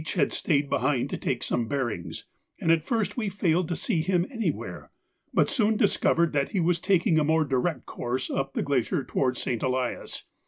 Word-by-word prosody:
had 150 -6 +2
stayed 145 -3 +1
behind 135 0 0
to - - -1
take 125 -2 -2
some 120 -2 -1
bearings, 120 -10 -3 0.3
and 165 - +2
at 165 -1 +4
first 225 -2 0
we 215 -4 0
failed 180 -3 +1
to 175 - -2
see 175 -4 0
him 180 0 +1
anywhere, 230 -4 -3 0.4
but - - +3
soon 220 -5 +2
discovered 170 -5 +2
that 140 -1 0
he 195 - +1
was 170 0 +2
taking 175 -4 +3
a - - +2
more 160 +1 +2
direct 140 +4 -1
course 125 +2 -3
up 135 0 -2
the - - 0
glacier 140 +3 0
towards 130 -1 0
St. 120 -3 -2
Elias. 130 -1 -2
155 Hz, 190 wpm, -27 LUFS, 130-180 Hz, 0.4 s, at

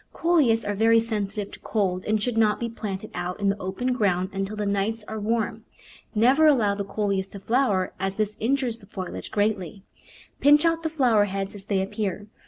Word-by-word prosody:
Coleus 295 -10 +2
are 205 - -1
very 225 +2 +4
sensitive 210 -3 -3
to - - -9
cold 185 -4 -1
and 215 0 +1
should 235 +2 -2
not 215 -2 +3
be 235 - -2
planted 215 -2 -6
out 180 +2 -4
in 200 -1 +2
the 200 +1 -1
open 205 +8 -2
ground 190 -5 0
until 195 +2 -3
the 210 -1 -2
nights 205 +2 -1
are 220 - -5
warm. 220 +1 -1 0.5
Never 260 +8 +5
allow 230 -9 +4
the 200 0 -3
Coleus 200 -1 -2
to 200 - -9
flower, 210 -4 +1
as 195 +1 -2
this 215 -1 -1
in 245 +5 +1
jures 245 -4 -3
the 200 - -17
foliage 185 -3 -6
greatly. 205 -3 -1 0.6
Pinch 295 +3 +5
out 330 0 +2
the 320 - -1
flower 245 -9 +3
heads 195 0 -4
as 200 -2 -11
they 195 -2 +1
appear. 205 -1 -3
210 Hz, 200 wpm, -25 LUFS, 195-230 Hz, 0.6 s, Never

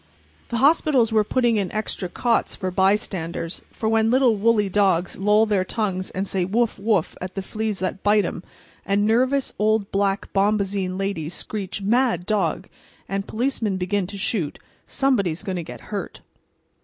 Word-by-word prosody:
The 235 - -1
hospitals 270 -4 +3
were 215 -1 +4
putting 240 0 +1
in 195 -3 -1
extra 215 -4 -3
cots 235 +5 0
for 185 -2 -3
bystanders. 185 -3 0
For 220 - -3
when 225 0 +3
little, 250 -2 +4
woolly 210 0 +2
dogs 190 -3 +1
loll 210 +3 +3
their 205 -4 +1
tongues 185 -2 -2
out - - -14
and 195 +1 -1
say 190 -1 0
"woof, 215 +4 0
woof!" 205 -5 +1
at 185 0 -6
the 195 - -3
fleas 215 +1 -3
that 190 +1 -3
bite 205 -1 +3
'em, 170 - -4 0.4
and 200 +1 +1
nervous 255 +5 +2
old 215 -1 +1
black 195 0 0
bombazine 195 -2 +1
ladies 185 -5 -3
screech 200 -2 -5
"Mad 230 -4 +2
dog!" 190 -3 0 0.4
and 195 0 -3
policemen 225 -4 -1
begin 185 +1 -1
to 200 +1 -7
shoot, 190 -6 -2 0.3
somebody 260 -9 +1
is 160 +4 -5
going 190 -3 -3
to - - -2
get 125 -6 -9
hurt. - - -5
200 Hz, 170 wpm, -23 LUFS, 190-220 Hz, 0.4 s, were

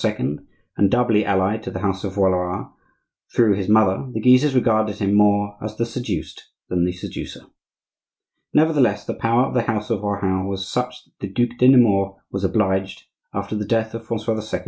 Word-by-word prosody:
and 95 +6 -2
doubly 115 -2 +2
allied 100 +2 +1
to - - -5
the 95 - -5
house 95 -1 -2
of 95 -2 -4
Valois 95 -2 0 0.7
through 115 -4 +4
his 100 0 -3
mother, 105 -2 +3
the 110 - -2
Guises 125 +4 +4
regarded 110 -4 +2
him 100 -1 0
more 105 0 +3
as 105 0 -6
the 115 - 0
seduced 120 +1 -5 0.2
than 90 -1 +1
the 90 - 0
seducer. 90 - -8 1.1
Nevertheless, 145 -9 +3
the - - -3
power 115 +3 +1
of - - -5
the 125 - +2
house 110 -1 -3
of 105 -4 0
Rohan 100 -2 -1
was 95 -1 -4
such 125 +2 -3
that - - -36
the 100 - -4
Duc 120 +4 -1
de 125 - +5
Nemours 100 -7 +4 0.2
was 100 0 -4
obliged, 95 -2 0 0.3
after 100 +2 -4
the 105 - -2
death 110 +1 0
of 115 0 -7
Francois 110 -1 -2
II. - - 0
105 Hz, 185 wpm, -21 LUFS, 95-115 Hz, 1.1 s, de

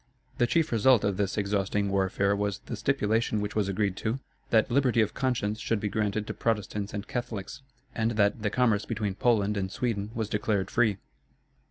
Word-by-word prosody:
The 120 - +4
chief 165 +3 +1
result 120 +1 +4
of 100 -2 0
this 100 0 -1
exhausting 100 0 0
warfare 100 +1 +1
was 100 -1 -1
the - - -4
stipulation 110 -2 +1
which 105 0 -3
was 105 -2 +1
agreed 100 -1 0
to, 110 +4 -1 0.3
that 110 +1 +3
liberty 125 -2 +3
of 110 -2 +2
conscience 115 -5 -1
should 115 -1 0
be 105 - -2
granted 105 0 -1
to - - -4
Protestants 105 -2 -2
and 105 0 -5
Catholics, 120 +1 -5 0.3
and 110 0 0
that 105 +1 +2
the 105 - +1
commerce 110 -3 +2
between 105 -4 -2
Poland 105 -1 +2
and 95 -1 -2
Sweden 105 -4 -2
was 110 -2 -1
declared 105 -2 -1
free. 110 -5 +2
105 Hz, 185 wpm, -28 LUFS, 100-115 Hz, 0.3 s, The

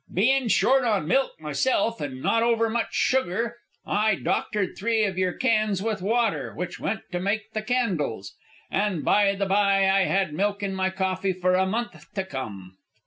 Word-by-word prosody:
"Bein' 255 +7 +2
short 265 +4 +3
on 210 -9 0
milk 270 +9 +1
myself, 225 - 0
an' 130 -3 -5
not 230 - +2
over 230 -1 +2
much 235 0 -1
sugar, 235 -1 0 0.3
I 215 0 +2
doctored 205 0 -1
three 225 +1 +1
of 195 -3 -1
your 185 -1 +1
cans 215 -6 +1
with 220 -4 -2
water, 200 - 0
which 180 +2 -5
went 220 +2 -2
to 180 - -2
make 210 +4 -2
the 215 - -3
candles. 185 - -1 0.4
An' 195 -5 0
by 200 -1 +3
the 200 0 -1
bye, 195 0 +3
I 190 0 +3
had 190 -5 0
milk 205 +4 -1
in 195 -1 -2
my 190 0 0
coffee 190 0 -1
for 180 0 +1
a 190 +1 +2
month 235 +5 -4
to 195 - -1
come." 100 - -7
200 Hz, 180 wpm, -25 LUFS, 185-225 Hz, 0.4 s, short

